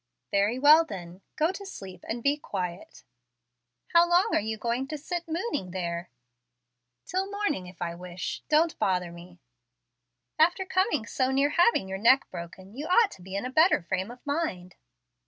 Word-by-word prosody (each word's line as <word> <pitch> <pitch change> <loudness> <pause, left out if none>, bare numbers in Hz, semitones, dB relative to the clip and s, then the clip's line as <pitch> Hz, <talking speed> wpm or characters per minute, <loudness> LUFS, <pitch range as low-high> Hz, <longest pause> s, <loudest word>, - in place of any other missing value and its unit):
"Very 205 +4 +2
well 300 +4 +7
then, 180 - -9
go 315 +3 +2
to 390 +1 -8
sleep 190 - -9
and 230 +1 -4
be 280 +1 +3
quiet." 185 -10 -6 0.9
"How 340 0 +6
long 360 +5 +4
are - - +4
you 220 +1 -3
going 240 +4 -2
to 305 - -4
sit 345 +4 -4
'mooning' 330 - -2
there?" 175 -1 -4 1.0
"Till 380 +2 -2
morning, 405 - -2
if 180 -1 -7
I 170 0 -3
wish. 180 +1 -6
Don't 315 +2 +3
bother 180 -2 0
me." 175 +1 -13 1.0
"After 350 +4 +3
coming 375 - +1
so 260 +4 0
near 275 +2 +2
having 350 - +3
your 190 0 -4
neck 255 +6 +5
broken, 185 +3 -9
you 295 +4 -5
ought 415 +4 +4
to - - -13
be 190 +2 -8
in 200 - -2
a 255 - -4
better 315 - +4
frame 185 +3 -2
of 245 +1 -12
mind." 285 - -2
240 Hz, 175 wpm, -27 LUFS, -, 1.0 s, well